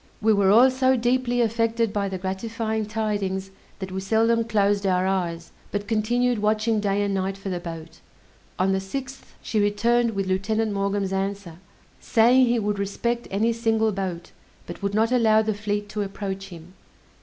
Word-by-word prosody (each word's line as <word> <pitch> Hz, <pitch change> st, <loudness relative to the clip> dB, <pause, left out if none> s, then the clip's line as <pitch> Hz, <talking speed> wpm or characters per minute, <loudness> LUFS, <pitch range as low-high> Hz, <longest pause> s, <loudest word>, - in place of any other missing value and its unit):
We 220 Hz, +1 st, +3 dB
were 200 Hz, -2 st, +3 dB
all 240 Hz, +6 st, +6 dB
so 260 Hz, 0 st, +2 dB
deeply 245 Hz, 0 st, +1 dB
affected 230 Hz, -1 st, 0 dB
by 200 Hz, -1 st, -1 dB
the 190 Hz, -, -4 dB
gratifying 220 Hz, +3 st, -3 dB
tidings, 205 Hz, -3 st, -2 dB, 0.3 s
that 190 Hz, -1 st, -6 dB
we 190 Hz, 0 st, -3 dB
seldom 225 Hz, +3 st, +2 dB
closed 205 Hz, -2 st, +1 dB
our 185 Hz, 0 st, +2 dB
eyes, 170 Hz, -3 st, -2 dB, 0.2 s
but 205 Hz, 0 st, -3 dB
continued 235 Hz, +2 st, +1 dB
watching 215 Hz, +1 st, +1 dB
day 205 Hz, 0 st, 0 dB
and 200 Hz, -1 st, -1 dB
night 195 Hz, 0 st, -2 dB
for 195 Hz, 0 st, -6 dB
the 180 Hz, -2 st, -2 dB
boat. 165 Hz, -2 st, -9 dB, 0.6 s
On 190 Hz, +1 st, +2 dB
the 190 Hz, -, +1 dB
6th 265 Hz, +8 st, -6 dB, 0.2 s
she 220 Hz, -, -1 dB
returned 230 Hz, +3 st, +2 dB
with 195 Hz, 0 st, -1 dB
Lieutenant 210 Hz, +4 st, 0 dB
Maughn's 200 Hz, -1 st, -1 dB
answer, 195 Hz, -3 st, -3 dB, 0.4 s
saying 245 Hz, +3 st, +4 dB
he 240 Hz, 0 st, +2 dB
would 205 Hz, -2 st, -1 dB
respect 235 Hz, +4 st, -2 dB
any 220 Hz, +4 st, +1 dB
single 225 Hz, -1 st, +1 dB
boat; 185 Hz, -3 st, -5 dB, 0.3 s
but 175 Hz, -, -9 dB
would 200 Hz, 0 st, -2 dB
not 225 Hz, +2 st, +2 dB
allow 220 Hz, -3 st, +4 dB
the 215 Hz, 0 st, 0 dB
fleet 205 Hz, 0 st, -3 dB
to 210 Hz, 0 st, -3 dB
approach 195 Hz, -1 st, -4 dB
him. 170 Hz, 0 st, -12 dB
205 Hz, 175 wpm, -24 LUFS, 195-225 Hz, 0.6 s, all